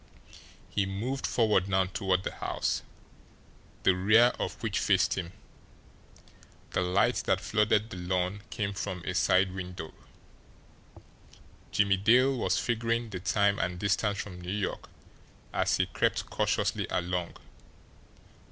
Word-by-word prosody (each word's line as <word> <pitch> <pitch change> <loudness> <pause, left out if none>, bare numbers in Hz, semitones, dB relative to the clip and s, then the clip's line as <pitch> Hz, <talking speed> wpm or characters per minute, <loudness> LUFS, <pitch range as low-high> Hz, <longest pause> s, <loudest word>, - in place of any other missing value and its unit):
He 100 -2 -1
moved 120 +8 -3
forward 105 -5 +2
now 95 -1 +3
toward 95 0 -1
the - - -3
house, - - -2 1.0
the 95 - +4
rear 110 +6 +5
of 90 - -2
which 110 -3 0
faced 95 -2 +3
him 90 -3 -4 1.4
the - - 0
light 90 +2 +2
that - - +3
flooded 105 +1 +1
the - - -6
lawn 90 +2 -1
came 100 -2 -2
from 90 -2 -4
a 90 - -2
side 95 +2 +3
window. 90 -3 -7 1.8
Jimmie 100 -1 +3
Dale 125 +7 +4
was 95 -6 0
figuring 115 +2 -1
the 90 - -4
time 100 +2 +2
and 90 0 -1
distance 100 +2 0
from 90 -3 -6
New 90 - -7
York 100 0 -3 0.6
as - - +1
he - - +2
crept - - -1
cautiously - - 0
along. 90 -1 -2
95 Hz, 130 wpm, -29 LUFS, 90-105 Hz, 1.8 s, rear